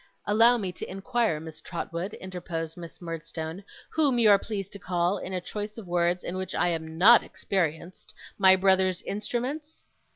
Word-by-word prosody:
'Allow 230 +4 +5
me 195 -5 -3
to - - -7
inquire, 195 -2 0
Miss 160 -1 -9
Trotwood,' 170 +3 -5
interposed 170 -3 -5
Miss 170 -2 -10
Murdstone, 165 +1 -6 0.3
'whom 290 -6 +2
you 225 -3 +6
are 200 - +6
pleased 200 -3 -5
to 200 - -7
call, 180 +1 0
in 190 - -6
a 185 - -1
choice 210 +4 -6
of 225 - -8
words 175 0 +1
in 180 - -4
which 185 -1 -4
I 175 - +2
am 160 -1 -4
not 220 +7 +8
experienced, 170 -1 -3 0.2
my 190 -1 +8
brother's 190 -1 +2
instruments? 255 +9 -4
185 Hz, 170 wpm, -27 LUFS, 170-210 Hz, 0.3 s, not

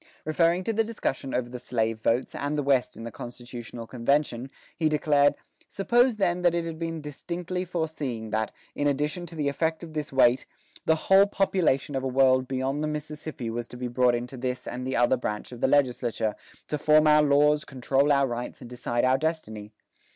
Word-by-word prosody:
Referring 170 +3 +2
to 225 - -1
the 225 +1 +2
discussion 135 - -3
over 125 -1 -1
the 125 0 -7
slave 115 -2 -1
votes 115 +3 0
and 145 +1 -2
the 145 - 0
West 130 -4 +1
in 115 - -8
the 115 - -6
constitutional 120 0 -8
convention, 130 +1 0 0.3
he 160 -2 +1
declared, 145 -1 +3 0.3
"Suppose, 240 +4 +2
then, 180 -3 +1
that 175 -1 +3
it 170 -1 -1
had 165 -1 -6
been 165 -1 -3
distinctly 175 +5 -4
foreseen 150 -10 -3
that, 110 0 -1 0.2
in 145 - 0
addition 150 +5 -1
to 170 - -10
the 150 -2 -1
effect 160 +4 -1
of 160 -2 -9
this 150 -1 -4
weight, 130 -2 +4 0.4
the 160 - +5
whole 195 +1 +6
population 180 -9 +1
of 135 - -1
a 135 - -2
world 130 0 +3
beyond 135 +2 -1
the 155 - 0
Mississippi 150 -5 -5
was 120 +1 -4
to 125 - -10
be 125 0 -3
brought 125 0 +3
into 125 +2 -5
this 125 0 -3
and 125 +1 -4
the 130 - -1
other 120 +2 +3
branch 105 -2 -4
of 120 0 -9
the - - +3
legislature, 125 -5 +1 0.3
to 150 - -2
form 155 +1 +5
our 150 0 +6
laws, 150 +1 +4
control 135 +2 +1
our 140 -1 +4
rights, 120 -1 -5
and 120 - -11
decide 120 -1 -1
our 130 +1 +3
destiny. 110 -10 -3
140 Hz, 200 wpm, -27 LUFS, 125-155 Hz, 0.4 s, whole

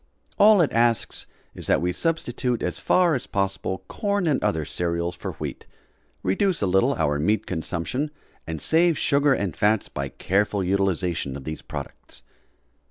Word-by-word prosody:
All 210 -2 +7
it 155 - +2
asks 115 -1 +1 0.3
is - - -3
that - - +4
we 90 +1 0
substitute 125 - -1
as - - -2
far 180 -3 +3
as 130 - -2
possible 95 -1 -2
corn 200 -2 -1
and 150 -5 +1
other 90 -8 0
cereals 85 +2 -2
for 85 - -5
wheat, - - -7 0.6
reduce 175 - +1
a - - +4
little 95 +1 +3
our 75 -3 0
meat 105 +8 +1
consumption 90 - -3 0.4
and 80 -1 -4
save 165 - +3
sugar 140 -1 +3
and 95 - -2
fats 105 +5 +2
by 70 0 -4
careful 100 +4 0
utilization 90 -6 0
of 70 - -10
these 80 +2 -5
products. - - -8
100 Hz, 160 wpm, -24 LUFS, 85-140 Hz, 0.6 s, All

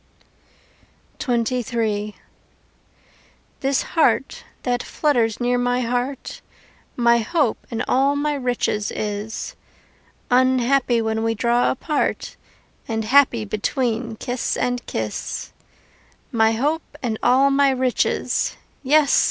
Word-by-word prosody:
XXIII 230 -4 -1 1.4
This 270 0 +1
heart 325 - +1 0.2
that 245 -1 0
flutters 235 -8 0
near 245 0 +1
my 245 0 +1
heart 245 +3 -3 0.5
My 235 -1 +4
hope 265 +2 0
and 230 - -3
all 275 +2 +3
my 295 +1 0
riches 245 -6 -1
is, 210 +1 -4 0.8
Unhappy 255 -1 +3
when 220 0 -1
we 225 0 0
draw 235 +3 +2
apart 300 +3 -2 0.5
And 220 -1 -2
happy 245 -2 +4
between 230 +2 -2
kiss 245 +3 -2
and 245 0 -1
kiss: 110 -1 -4 0.8
My 225 -1 +3
hope 295 +5 -2
and 225 -3 -2
all 270 +2 +4
my 275 0 +4
riches 260 -2 0 0.2
yes! 290 +1 +4
245 Hz, 105 wpm, -22 LUFS, 225-270 Hz, 1.4 s, My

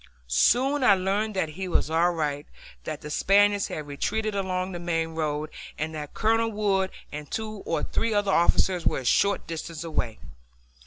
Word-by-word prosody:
Soon 255 - +3
I 205 -5 +7
learned 200 +3 -1
that 175 -4 0
he 185 +5 -5
was 165 -3 0
all 165 +2 +4
right, 150 -4 -2 0.4
that 155 -2 -5
the 150 - -7
Spaniards 205 +3 +3
had 155 - -5
retreated 215 +10 -2
along 185 -1 -1
the 175 - -5
main 165 -1 -1
road, 155 -1 -2 0.3
and 155 +1 -3
that 150 -2 -7
Colonel 225 +1 +2
Wood 200 -3 +1 0.2
and 150 -1 -7
two 215 -2 -4
or - - 0
three 230 - -1
other 205 -2 +1
officers 175 0 +3
were - - +1
a 130 - -5
short 200 +11 +2
distance 165 0 -6
away. 125 -9 -2
180 Hz, 175 wpm, -26 LUFS, 155-205 Hz, 0.4 s, I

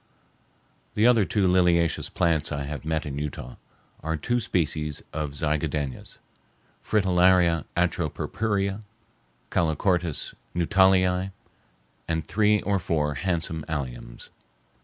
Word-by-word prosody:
The 105 - +3
other 115 -5 +5
liliaceous 90 -4 +2
plants 80 -4 +1
I 70 -1 -2
have 75 +1 -5
met 80 0 -1
in 70 -1 -4
Utah 70 -4 -6 0.4
are 80 +1 -2
two 120 +11 0
species 80 - -2
of 75 -2 -3
zigadenas, 75 -3 -2 0.7
Fritillaria 90 -4 +3
atropurpurea, 95 +4 -1 0.7
Calochortus 85 0 0 0.2
Nuttallii, 95 +1 +3 0.8
and 80 -2 -1
three 105 +1 +3
or 100 -1 +1
four 75 -4 0
handsome 80 -1 -2
alliums. 65 -5 -5
85 Hz, 95 wpm, -26 LUFS, 75-95 Hz, 0.8 s, other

